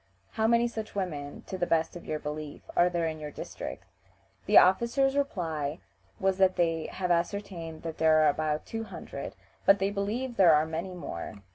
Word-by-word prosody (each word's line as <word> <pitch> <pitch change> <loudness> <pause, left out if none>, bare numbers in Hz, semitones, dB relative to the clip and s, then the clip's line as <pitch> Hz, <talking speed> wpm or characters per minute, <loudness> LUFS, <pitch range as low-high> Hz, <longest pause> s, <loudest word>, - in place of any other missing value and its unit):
How 220 0 +1
many 235 +1 +4
such 220 -3 -6
women 150 -7 -4
(to 190 - -6
the 175 - 0
best 165 0 +1
of 175 - -9
your 155 - -1
belief) 150 0 -6
are 175 - +5
there 170 -1 -1
in 160 -1 -3
your 150 -1 -5
district?" - - -7 0.6
The 205 - +6
officers 235 +8 +5
reply 165 - -1 0.4
that 190 -1 +3
they 165 -2 +1
have 180 -1 -2
ascertained 170 -2 -2
that 165 -1 -6
there 160 -1 +5
are 150 - +6
about 155 +1 -1
two 225 0 -4
hundred, - - -7 0.3
but 195 - +6
they 195 +1 0
believe 225 +5 -2
there 175 -5 +7
are 150 +1 +3
many 165 +4 -4
more. 100 - -7
175 Hz, 180 wpm, -29 LUFS, 155-200 Hz, 0.6 s, there